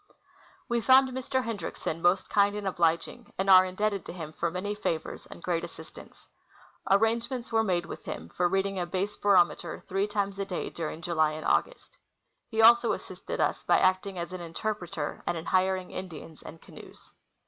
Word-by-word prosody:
A¥e 235 -2 0
found 265 +2 +6
Mr. 260 0 -2
Hendriksen 205 -7 -4
most 180 +2 +3
kind 205 0 +3
and 210 -1 -5
obliging, 170 -3 0
and 195 +1 +2
are 185 0 +9
indebted 200 +1 -1
to - - -6
him 160 -3 -7
for 170 - -1
manv 205 +4 -4
favors 160 -1 -3
and - - -12
great 170 -2 -1
assistance. - - -11 0.6
Arrange 225 +4 +3
ments 255 -2 -5
were 225 0 +3
made 175 -4 0
with - - -8
him 80 - -6
for 175 - +1
reading 195 +1 0
a 175 - -2
base 195 +3 -2
barometer 175 -4 +2
three 195 +2 0
times 200 -1 -2
a 195 - -1
day 185 -2 -4
during 165 0 -5
July 155 -3 +1
and 155 +1 -6
August. - - -1 0.5
He 225 -1 +2
also 235 +1 +7
assisted - - -6
us - - 0
by - - +4
acting 185 +1 +1
as 170 +1 -5
an 185 - -5
interpreter, 170 -3 -4
and 175 - 0
in 165 - -6
hiring 185 0 +1
Indians 165 -4 -8
and 160 - -11
canoes. - - -14
190 Hz, 180 wpm, -28 LUFS, 175-210 Hz, 0.6 s, are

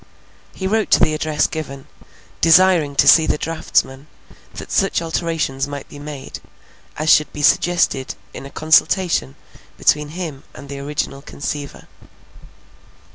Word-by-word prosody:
He 190 - -5
wrote 215 +3 0
to - - +5
the 155 - +3
address 155 0 0
given, 140 -4 -6 0.6
desiring 165 -3 +4
to - - +3
see 160 -1 +7
the - - +1
draughtsman, 150 -3 -2 0.5
that - - -9
such 195 - +1
alterations 160 -5 -2
might 145 -1 -7
be 145 - -11
made, 145 -2 -8 0.6
as 155 - -3
should 150 - +4
be 150 - -6
suggested 170 -6 +2 0.2
in 135 - -8
a - - -12
consultation 160 - +2 0.4
between 150 0 +2
him 160 -4 -6
and 140 - -11
the 140 0 -6
original 140 -1 -4
conceiver. 145 0 -6
150 Hz, 135 wpm, -19 LUFS, 140-165 Hz, 0.6 s, see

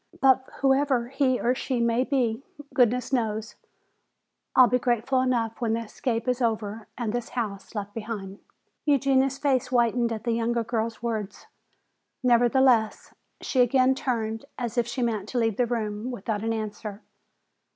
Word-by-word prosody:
But 265 -1 +4
whoever 270 -3 +2
he 265 -2 +1
or 245 - +2
she 260 -1 -2
may 235 +1 +2
be, 255 -4 0 0.3
goodness 250 +1 +2
knows, 220 -3 -1 1.0
I'll 255 - +9
be 250 +1 +2
grateful 250 +2 +1
enough 235 -3 -1
when 225 -2 +1
the 230 - -1
escape 230 +2 -3
is 250 0 0
over 220 -2 -2
and 230 -3 -2
this 240 -1 -3
house 210 -4 -5
left 205 -1 -4
behind!" 210 -3 -6 0.4
Eugenia's 270 -2 +2
face 275 -2 +1
whitened 240 -1 +2
at 220 -1 -4
the 235 - 0
younger 230 +1 0
girl's 230 -1 -3
words. 215 -4 -4 0.8
Nevertheless, 245 -2 +3 0.3
she 260 - +1
again 255 +1 +4
turned 230 -4 -2
as 240 -1 -3
if 240 -2 +1
she 245 +1 -2
meant 215 -4 -2
to 255 - -3
leave 225 -3 +1
the 245 - +2
room 220 -1 -3
without 220 -3 -3
an 225 - 0
answer. 215 -1 -5
235 Hz, 155 wpm, -26 LUFS, 225-255 Hz, 1.0 s, I'll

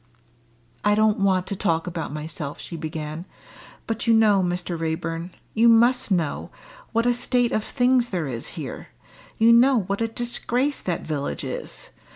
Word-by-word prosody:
"I 205 0 +4
don't 215 -1 +3
want 190 -2 +2
to 200 - -4
talk 165 -3 0
about 170 -4 -4
myself," 150 -1 -6
she 170 - -7
began. 155 0 -5 0.6
"But 225 +1 -3
you 230 - +6
know, 210 -3 +5
Mr. 175 -1 -2
Raeburn 165 +1 -3 0.2
you 230 +2 +5
must 240 +2 +4
know 170 -7 -1 0.4
what 230 0 +1
a 245 - +4
state 245 0 +1
of 215 - 0
things 250 -1 +2
there 180 -7 -2
is 120 -4 -4
here - - -6 0.5
you 230 +1 +6
know 245 0 +5
what 200 +3 -3
a 225 - +2
disgrace 240 +4 -1
that 175 -2 -3
village 145 -3 -3
is. - - -6
200 Hz, 165 wpm, -24 LUFS, 165-235 Hz, 0.6 s, you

